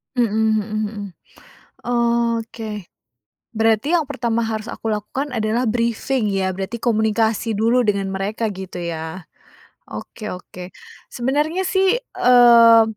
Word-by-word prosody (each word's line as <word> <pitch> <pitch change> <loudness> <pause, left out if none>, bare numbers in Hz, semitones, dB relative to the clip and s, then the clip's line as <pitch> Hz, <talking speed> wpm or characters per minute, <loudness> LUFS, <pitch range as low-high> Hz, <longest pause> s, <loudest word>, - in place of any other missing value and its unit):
Mhm 220 -3 +1 0.2
mhm 210 +1 -6
mhm. 215 -1 -3 0.8
Oke. 230 -4 -1 0.6
Berarti 225 +4 +1
yang 315 - -2
pertama 235 -4 -1
harus 220 0 -4
aku - - -8
lakukan 255 +7 -4
adalah 225 +2 0
brifing 235 0 0
ya, 190 -1 -1
berarti 195 +5 -4
komunikasi 220 -1 +1
dulu 235 +3 +3
dengan 200 -3 0
mereka 205 +4 -2
gitu 185 -1 -7
ya? 165 0 -5 0.6
Oke 215 - -8
oke. 180 0 -10 0.3
Sebenarnya 295 +8 -1
sih, 380 +1 +2
eee, 235 - +6
225 Hz, 115 wpm, -20 LUFS, 210-240 Hz, 0.8 s, eee